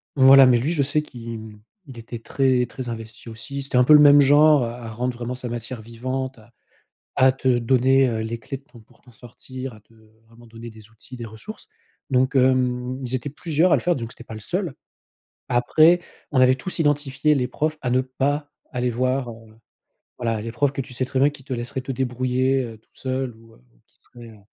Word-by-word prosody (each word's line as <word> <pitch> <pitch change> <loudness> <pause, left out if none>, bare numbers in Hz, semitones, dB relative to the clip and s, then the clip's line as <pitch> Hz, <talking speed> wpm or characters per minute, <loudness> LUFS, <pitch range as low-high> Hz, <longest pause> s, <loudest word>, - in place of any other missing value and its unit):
Voilà, 135 0 +8
mais 125 -1 +5
lui 145 +8 -1
je 145 - +1
sais 145 +2 0
qu'il, 115 -6 -8
mmh, 110 -1 -12 0.3
il 130 -3 -11
était 115 +1 -8
très, 130 0 +1
très 125 +1 -7
investi 115 0 -8
aussi, 125 +5 -7
c'était 135 -2 -1
un 125 - +6
peu 150 +5 +6
le 150 - +9
même 145 0 +8
genre 145 0 +5
à 120 +1 -5
à 115 - -7
rendre 125 +2 -3
vraiment 120 +1 -4
sa 125 -1 -6
matière 120 0 -6
vivante, 130 +4 -5
à 115 +1 -20 0.6
à 130 0 +6
te 130 0 -8
donner, 130 +2 +3
heu, 110 -2 -2
les 115 +1 -4
clés 125 +5 -6
de 135 - -18
ton 125 -5 -17
pour 110 - -25
t'en 125 - -19
sortir, 125 +2 -9
à 110 - -16
te, 105 - -29 0.4
vraiment, 120 +1 -18
donner 115 +1 -10
des 110 -1 -16
outils, 115 +3 -15
des 120 - -7
ressources. 115 - -11 0.4
Donc 130 +1 +2
hem, 125 -1 +1
ils 125 0 -4
étaient 130 +2 -3
plusieurs 160 +4 +1
à - - +6
le - - -3
faire, 175 0 +1
donc 115 -2 -6
c'était 120 - -14
pas 110 - -9
le 110 - -8
seul. 180 - -3 0.8
Après 155 +8 +4 0.3
on 130 - +2
avait 130 0 +6
tous 155 +9 -5
identifié 145 -1 +1
les 130 -4 0
profs 155 +3 -2
à 125 - -2
ne 125 +1 +2
pas 140 +3 -2 0.2
aller 125 -1 -1
voir, 130 +1 -1
heu, 110 -1 -15 0.6
voilà, 115 -3 -2
les 115 - -5
profs 140 +4 0
que 135 - -4
tu 130 - -7
sais 125 +1 -2
très 130 0 -2
bien 140 +2 +5
qui 145 -2 -14
te 135 - -7
laisseraient 120 +1 -4
te 135 - -4
débrouiller, 130 +1 0
heu, 115 -2 -9
tout 110 - -37
seul 130 -1 -3
ou 115 0 -19
heu, - - -23 0.3
qui - - -39
seraient, 120 -1 -14
heu 110 - -16
130 Hz, 230 wpm, -23 LUFS, 115-135 Hz, 0.8 s, le